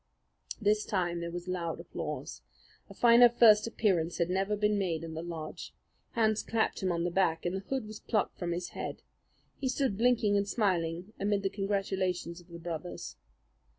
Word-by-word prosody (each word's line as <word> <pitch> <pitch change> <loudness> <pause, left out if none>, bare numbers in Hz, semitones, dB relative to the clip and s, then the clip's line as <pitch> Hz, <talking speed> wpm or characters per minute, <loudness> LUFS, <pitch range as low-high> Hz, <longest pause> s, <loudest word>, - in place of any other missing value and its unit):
This 210 0 +2
time 175 -3 -1
there 170 0 -4
was 175 +1 -6
loud 175 -3 -2
applause. - - -6 0.5
A - - -10
finer 240 0 +7
first 225 -2 +6
appearance 180 -7 +1
had 170 0 0
never 195 +3 +1
been 210 0 +1
made 170 -4 -1
in 165 -1 -6
the 160 - -4
lodge. 165 -2 -7 0.4
Hands 220 -2 +2
clapped 225 -1 -1
him 185 -1 +1
on 170 -1 -1
the 175 - -1
back, 170 -3 +1
and 175 +2 0
the - - -1
hood 265 -4 -1
was 215 0 -8
plucked 215 -3 -1
from 175 -1 -2
his 175 +1 -3
head. - - -6 0.6
He 265 - -1
stood 255 -6 0
blinking 235 -4 +3
and 200 0 0
smiling 180 -2 0
amid 200 0 +1
the 195 - +1
congratulations 190 -3 -2
of 175 - -21
the 170 -1 -9
brothers. 170 +1 -6
190 Hz, 185 wpm, -31 LUFS, 170-215 Hz, 0.6 s, finer